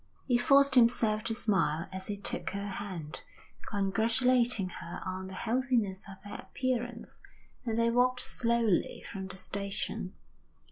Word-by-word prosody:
He 250 - +2
forced 275 +2 +5
himself 230 -3 +4
to 225 - -1
smile 190 -7 +1
as 190 0 -4
he 205 - -3
took 200 - -2
her 200 +1 -4
hand, 190 -6 -6 0.5
congratulating 225 +2 +2
her 170 - -7
on 185 0 -4
the 190 - -8
healthiness 230 -4 0
of 195 - -8
her - - -6
appearance; 245 -2 -3 0.5
and 225 -1 0
they 230 0 +3
walked 250 +1 +3
slowly 230 -5 +1
from 190 -1 -5
the 190 0 -6
station. 200 -1 -2
215 Hz, 140 wpm, -31 LUFS, 190-240 Hz, 0.5 s, forced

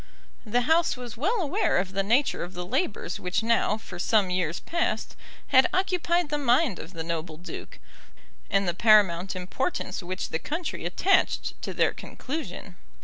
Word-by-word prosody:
The 245 +3 +2
House 320 +3 +2
was 245 -3 -7
well 395 - 0
aware 360 +7 +1
of 185 +1 0
the 195 - +1
nature 235 +8 +2
of 175 +2 -8
the 180 0 -4
labours 255 - -2
which 185 +4 -1
now 225 -2 +2
for 185 -5 -10
some 200 -1 +2
years 180 -2 0
past 340 0 -2 0.3
had 260 +7 +6
occupied 355 -3 +1
the 295 0 -1
mind 255 - +2
of 165 - -9
the 165 -2 -4
noble 165 -1 -4
duke; 175 - -9 0.7
and 195 -1 +2
the 175 - +1
paramount 195 -3 +4
importance 185 - -3
which 185 +1 -4
the 160 - -2
country 320 - -4
attached 380 - +2
to - - -4
their - - +2
conclusion. 205 - -7
215 Hz, 165 wpm, -27 LUFS, 180-300 Hz, 0.7 s, had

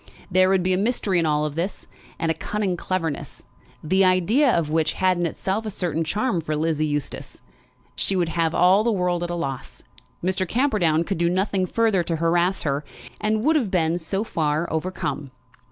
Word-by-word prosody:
There 185 +1 +4
would 190 -2 +2
be 185 +1 +2
a 185 - +1
mystery 205 -4 +1
in 165 - +1
all 150 0 +1
this, 170 +6 -4 0.3
and 165 - 0
a - - +1
cunning 195 +3 -2
cleverness, 165 -6 -4 0.4
the 190 +5 +3
idea 190 - +3
of 160 -6 0
which 160 0 +1
had 185 -1 +2
in 175 -1 0
itself 195 +6 -2
a 220 - -4
certain 170 -5 -1
charm 205 +2 -1
for 155 -1 -3
Lizzie 155 0 0
Eustace. 145 -1 -4 0.6
She 195 - -1
would 175 -3 +1
have 165 -1 0
all 185 +4 +5
the 235 - +2
world 180 -3 0
at 175 - -3
a 175 - -2
loss. 135 -6 -5 0.4
Mr. 185 +1 0
Camperdown 200 - +2
could 195 0 -3
do 170 0 +2
nothing 185 +1 0
further 220 -2 +2
to 170 0 -2
harass 170 +3 +1
her; 140 0 -1 0.4
and 215 +1 0
would 315 +4 +3
have 250 -10 +1
been, 170 -2 +1
so 195 +5 -2
far, 155 -4 -1
overcome. 160 -4 -3
180 Hz, 190 wpm, -23 LUFS, 160-195 Hz, 0.6 s, all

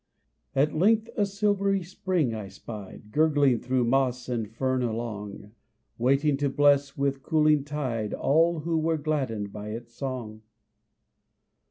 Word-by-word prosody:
At 145 +2 +2
length 220 +7 +2
a 205 -2 +1
silvery 200 -1 +1
spring 175 -7 -1
I 105 -3 -5
spied, 105 +1 -10
Gurgling 145 -4 +3
through 125 +1 0
moss 125 0 +1
and 115 -4 -2
fern 130 +2 0
along, 110 -3 -4 0.5
Waiting 140 +4 +2
to 140 0 0
bless 140 0 +3
with 140 -1 0
cooling 155 -1 +3
tide 130 -7 -3
All 165 +2 +2
who 165 +1 0
were 160 +1 +1
gladdened 130 -10 -2
by 105 0 -7
its 115 +2 -7
song. 120 -5 -5
135 Hz, 135 wpm, -27 LUFS, 115-155 Hz, 0.5 s, Gurgling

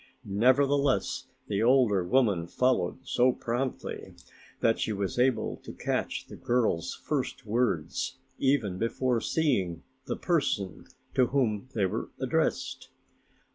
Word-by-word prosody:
Nevertheless, 130 +4 +2 0.2
the 100 0 0
older 115 -6 +4
woman 100 -5 +2
followed 130 +4 0
so 125 0 +4
promptly 130 +1 -4 0.4
that 115 - +2
she - - 0
was 100 +2 -2
able 125 -2 +2
to - - -10
catch - - -2
the - - -10
girl's 110 -9 0
first 130 -3 -3
words 105 -8 -1 0.2
even 120 -9 +1
before 120 +1 0
seeing 100 - 0 0.2
the - - -3
person 140 - -1 0.3
to 130 -2 +4
whom 125 -3 0
they 100 -4 +2
were 95 - -3
addressed. - - -1
120 Hz, 120 wpm, -29 LUFS, 100-130 Hz, 0.4 s, older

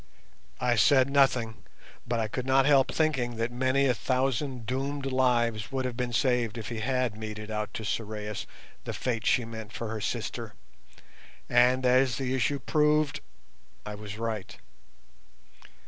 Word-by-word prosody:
I 125 -2 +2
said 130 +5 +5
nothing, 125 -5 +3 0.5
but 120 -1 0
I 110 - 0
could 125 +4 -4
not 135 0 +4
help 140 -2 +4
thinking 135 -7 0
that 115 +1 -2
many 130 +2 +2
a 130 - +3
thousand 130 0 -1
doomed 135 +3 -2
lives 120 -5 +1
would 130 -1 -1
have 125 -2 -3
been 125 0 -2
saved 120 -2 +1
if 110 - -5
he 115 -2 -4
had 125 -1 0
meted 110 0 -6
out 105 0 -3
to 110 - -4
Sorais 105 -1 -4 0.4
the - - -5
fate 115 -3 -2
she 120 - +3
meant 110 -2 -8
for 115 - -4
her 110 -1 -4
sister. - - -4 0.9
And, 125 +1 +4
as 125 -1 +4
the 130 -1 -2
issue 130 +2 +1
proved, 150 +1 +2 0.7
I 105 - -5
was 105 0 -8
right. 110 -4 -4
125 Hz, 155 wpm, -28 LUFS, 110-130 Hz, 0.9 s, said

